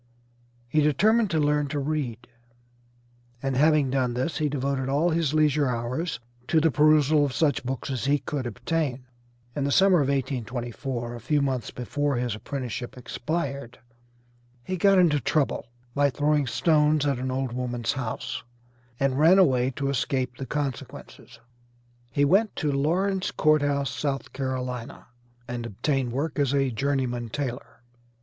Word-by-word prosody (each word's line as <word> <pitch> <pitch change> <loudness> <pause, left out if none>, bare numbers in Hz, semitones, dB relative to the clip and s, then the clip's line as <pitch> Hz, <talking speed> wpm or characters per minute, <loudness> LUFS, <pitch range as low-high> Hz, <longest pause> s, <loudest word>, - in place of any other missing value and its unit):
He 155 +5 +2
determined 210 - +3
to 165 - 0
learn 150 -1 +2
to 145 +1 -4
read, 135 -5 -3 1.1
and 135 +1 -2
having 150 -1 +3
done 130 -3 0
this 130 +7 -2
he 150 -1 +1
devoted 135 -1 -1
all 150 +6 +2
his 160 -2 0
leisure 150 -2 +3
hours 125 +7 -2 0.3
to 160 - +3
the 160 0 +3
perusal 150 0 +4
of 140 -3 -1
such 145 -6 +1
books 130 +1 -4
as 130 -1 -2
he 145 +1 +3
could 140 -3 -4
obtain. 130 +2 -2 0.5
In 145 - -1
the 140 - 0
summer 190 +3 +5
of 135 - +1
1824, 120 -2 -3
a 120 - -7
few 145 +6 +1
months 135 -4 -1
before 145 +3 -2
his 120 -2 -1
apprenticeship 125 +1 -5
expired, 140 -1 -4 0.9
he 185 - -3
got 195 +2 +4
into 165 -5 +4
trouble 140 -1 0 0.3
by 145 +1 +3
throwing 145 0 +1
stones 150 +2 +2
at 140 -3 0
an 130 +1 -2
old 130 -1 -2
woman's 120 -2 -2
house, 130 -5 -4 0.6
and 135 0 +1
ran 165 +5 +6
away 130 -9 +4
to 140 - -2
escape 130 -1 -1
the 135 - -6
consequences. 140 -4 -6 0.7
He 145 +4 +2
went 200 +8 +3
to 150 -3 0
Lauren's 185 +7 0
Court 155 -1 +3
House, 140 -1 0
South 140 -2 -3
Carolina, 130 -3 -4 0.4
and 120 -1 -4
obtained 130 +4 -1
work 145 +5 -2
as 140 -1 +2
a 135 -2 +1
journeyman 125 -1 -1
tailor. 125 -1 -5
140 Hz, 155 wpm, -26 LUFS, 125-150 Hz, 1.1 s, ran